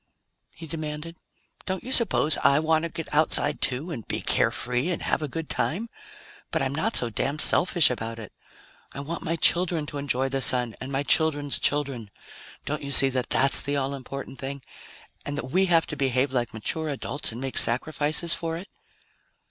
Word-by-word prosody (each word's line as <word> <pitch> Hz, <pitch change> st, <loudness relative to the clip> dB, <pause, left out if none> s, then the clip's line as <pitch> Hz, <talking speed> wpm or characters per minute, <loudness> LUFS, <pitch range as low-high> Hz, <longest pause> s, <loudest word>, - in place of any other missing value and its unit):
he 165 Hz, -, -9 dB
demanded. 155 Hz, +1 st, -6 dB, 0.5 s
"Don't 190 Hz, -1 st, -3 dB
you 260 Hz, -, -6 dB
suppose 200 Hz, -, +3 dB
I 140 Hz, -, +4 dB
want 160 Hz, +1 st, +1 dB
to -, -, -3 dB
get 165 Hz, -2 st, -7 dB
outside, 155 Hz, +1 st, +2 dB
too, 135 Hz, +7 st, -1 dB
and 115 Hz, -, -6 dB
be -, -, -2 dB
carefree 125 Hz, +6 st, 0 dB
and 175 Hz, -, -3 dB
have -, -, 0 dB
a 150 Hz, -, -2 dB
good 160 Hz, +2 st, -5 dB
time? 215 Hz, +8 st, -2 dB, 0.6 s
But -, -, -1 dB
I'm 135 Hz, 0 st, -1 dB
not 195 Hz, +10 st, -1 dB
so 120 Hz, -2 st, +3 dB
damn 140 Hz, +6 st, -2 dB
selfish 170 Hz, -1 st, +5 dB
about 115 Hz, -1 st, -5 dB
it. 110 Hz, -3 st, -10 dB, 0.6 s
I -, -, -7 dB
want 165 Hz, +4 st, -5 dB
my 165 Hz, +1 st, -2 dB
children 170 Hz, -2 st, +2 dB
to 145 Hz, 0 st, -6 dB
enjoy 135 Hz, -2 st, 0 dB
the 135 Hz, 0 st, -2 dB
Sun, 125 Hz, -4 st, +3 dB
and 130 Hz, +2 st, -6 dB
my 135 Hz, +1 st, -1 dB
children's 145 Hz, -2 st, +2 dB
children. 135 Hz, -7 st, -1 dB, 0.6 s
Don't 150 Hz, +1 st, -3 dB
you 140 Hz, -, -6 dB
see 135 Hz, -1 st, +6 dB
that 130 Hz, -1 st, -2 dB
that's 135 Hz, +1 st, +2 dB
the 145 Hz, +1 st, -2 dB
all 135 Hz, 0 st, -2 dB
important 135 Hz, 0 st, -8 dB
thing 135 Hz, 0 st, -6 dB, 0.6 s
and 145 Hz, 0 st, -5 dB
that 130 Hz, -, -5 dB
we 190 Hz, +3 st, +2 dB
have 165 Hz, -2 st, +3 dB
to 150 Hz, -, -6 dB
behave 130 Hz, -1 st, 0 dB
like 120 Hz, -3 st, -1 dB
mature 155 Hz, +8 st, -3 dB
adults 145 Hz, -1 st, -1 dB
and 115 Hz, -, -8 dB
make 135 Hz, 0 st, 0 dB
sacrifices 150 Hz, +6 st, +1 dB
for 165 Hz, -1 st, -3 dB
it?" 185 Hz, +4 st, -10 dB
145 Hz, 190 wpm, -25 LUFS, 130-160 Hz, 0.6 s, see